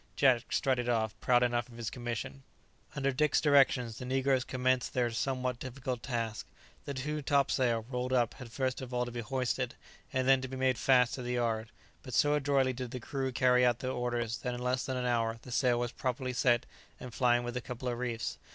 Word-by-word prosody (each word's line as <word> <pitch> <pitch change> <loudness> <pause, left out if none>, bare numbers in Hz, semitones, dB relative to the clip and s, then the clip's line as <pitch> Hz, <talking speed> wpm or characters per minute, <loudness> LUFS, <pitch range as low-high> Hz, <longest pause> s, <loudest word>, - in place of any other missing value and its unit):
Jack 125 -4 +3
strutted 125 -2 +1
off, 110 -2 +1
proud 125 -1 +3
enough 120 0 0
of 115 - -13
his 115 -4 -4
commission. 120 +2 -5 0.5
Under 140 -1 +1
Dick's 145 +2 +2
directions, 135 -6 +3
the 125 - -6
negroes 130 0 +1
commenced 130 -2 0
their 120 -2 +1
somewhat 125 0 -1
difficult 130 -1 -4
task. 115 -4 -3 0.4
The 140 - -4
new 150 +3 -3
topsail, 130 -5 +2
rolled 125 0 -3
up, 120 -3 +2
had 125 -4 -10
first 130 +1 -1
of 125 -1 -6
all 125 0 +1
to 120 - -6
be 120 - -5
hoisted, 125 +1 -2 0.4
and 130 -2 0
then 135 -1 +5
to 130 - -4
be 130 0 -6
made 130 -2 +1
fast 125 -2 +4
to 130 - -4
the 125 0 -3
yard; 115 -2 -1 0.3
but 130 -4 -6
so 145 +4 +4
adroitly 140 -3 +2
did 125 0 -5
the 125 - -5
crew 135 +2 -3
carry 125 0 +4
out 120 -2 +4
their 130 +1 -3
orders, 120 -2 -2
that 125 -1 -3
in - - -6
less 125 +1 0
than 130 -1 -2
an 125 - -2
hour 115 -2 +1
the 125 - -10
sail 120 0 +2
was 120 0 -1
properly 130 0 -2
set 120 -1 +2 0.3
and 125 -2 -8
flying 120 -1 +3
with 120 0 -5
a 125 - -2
couple 125 +2 -6
of 120 -1 -2
reefs. 120 -2 -3
125 Hz, 215 wpm, -31 LUFS, 120-130 Hz, 0.5 s, then